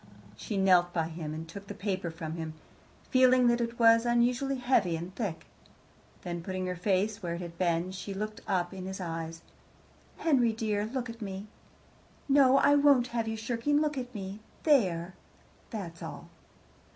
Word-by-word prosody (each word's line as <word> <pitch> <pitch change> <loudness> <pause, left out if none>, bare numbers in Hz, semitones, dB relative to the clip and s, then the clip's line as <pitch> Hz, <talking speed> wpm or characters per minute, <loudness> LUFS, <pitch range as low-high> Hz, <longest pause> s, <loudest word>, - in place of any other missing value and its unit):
She 200 - -4
knelt 180 -2 +4
by 165 -2 0
him 160 -2 -5
and 160 +1 -6
took 200 +4 -10
the 205 - -7
paper 190 -3 -2
from 165 -1 -6
him, 160 -1 -5 0.6
feeling 255 -1 +5
that 240 0 +3
it 235 0 -3
was 230 -1 +6
unusually 245 +3 +2
heavy 245 -9 +2
and 170 +3 -6
thick. 195 -7 -4 0.8
Then, 175 -1 -4
putting 185 +1 -3
her 180 0 -2
face 200 +4 0
where 170 -2 -3
it 170 - -6
had 170 -1 -7
been, 175 0 +1
she 190 +1 -6
looked 215 +2 -4
up 185 -2 0
in 185 -1 -6
his 190 0 -5
eyes. 165 -2 -5 0.7
"Henry 250 -8 +3
dear, 215 -2 -1
look 255 +1 -3
at 230 0 -9
me. 195 -1 -5 0.8
No, 275 -1 +6
I 285 - +5
won't 280 -4 +5
have 230 -2 0
you 220 0 -2
shirking. 240 +6 0
Look 300 -1 0
at 250 -2 -5
me. 195 0 -6 0.2
There. 185 - +2 0.6
That's 175 -7 -6
all." - - -8
200 Hz, 175 wpm, -30 LUFS, 175-240 Hz, 0.8 s, was